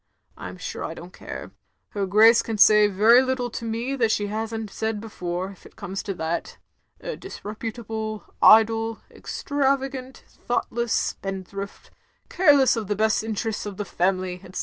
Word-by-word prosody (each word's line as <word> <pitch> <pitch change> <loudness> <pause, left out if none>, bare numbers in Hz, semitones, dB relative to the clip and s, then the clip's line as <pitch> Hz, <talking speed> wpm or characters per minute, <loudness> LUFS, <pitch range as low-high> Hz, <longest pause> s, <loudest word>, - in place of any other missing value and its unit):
I'm - - -8
stire - - -6
I - - -4
don't - - -11
care. - - -8 0.4
Her 200 -2 -2
Grace 220 +4 +6
can 225 -2 -4
say 210 0 +7
very 215 +5 +6
little 260 -2 -1
to 235 - -6
me 230 +4 -2
that 230 -3 +2
she 205 -1 +1
has 220 +2 -3
n't 220 -2 -5
said 220 -1 -2
before, 185 -3 -4
if 195 - -17
it - - -16
comes 190 +2 -5
to 195 - -4
that. 165 0 -3 0.4
A - - -4
disreputable, 220 - -6 0.2
idle, 225 0 +5
extravagant, 270 -2 -2
thoughtless 235 -1 -3
spendthrift, 195 -1 -4 0.4
care 300 -6 +5
less 265 -2 +4
of 220 -3 -4
the 205 - 0
best 215 +1 +1
interests 220 -1 -3
of 200 -2 -7
the 205 - -3
family, 185 0 -1
etc." - - -12
220 Hz, 165 wpm, -24 LUFS, 200-235 Hz, 0.4 s, say